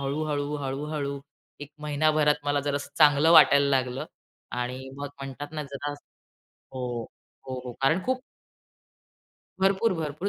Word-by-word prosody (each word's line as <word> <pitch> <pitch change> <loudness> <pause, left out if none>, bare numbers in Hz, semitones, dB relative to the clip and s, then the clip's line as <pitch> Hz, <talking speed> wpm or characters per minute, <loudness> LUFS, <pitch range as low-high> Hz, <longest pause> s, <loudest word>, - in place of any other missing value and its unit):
हळू-हळू, 145 +1 -2
हळू-हळू 140 0 -3 0.4
1 145 0 -8
महिनाभरात 150 0 +2
मला 145 0 +1
जरा 145 0 -1
असं 145 - -6
चांगलं 150 0 +6
वाटायला 140 -4 +7
लागलं 130 -1 0 0.5
आणि 125 +2 -4
मग 145 0 -5
म्हणतात 135 +1 -6
ना 155 -1 -3
जरा 140 +1 -5 0.6
हो, 125 -3 -6 0.4
हो 130 -1 -5
कारण 155 +7 +3
खूप 255 0 0 1.4
भरपूर, 195 +3 +3
भरपूर 160 +3 -3
145 Hz, 125 wpm, -27 LUFS, 135-150 Hz, 1.4 s, वाटायला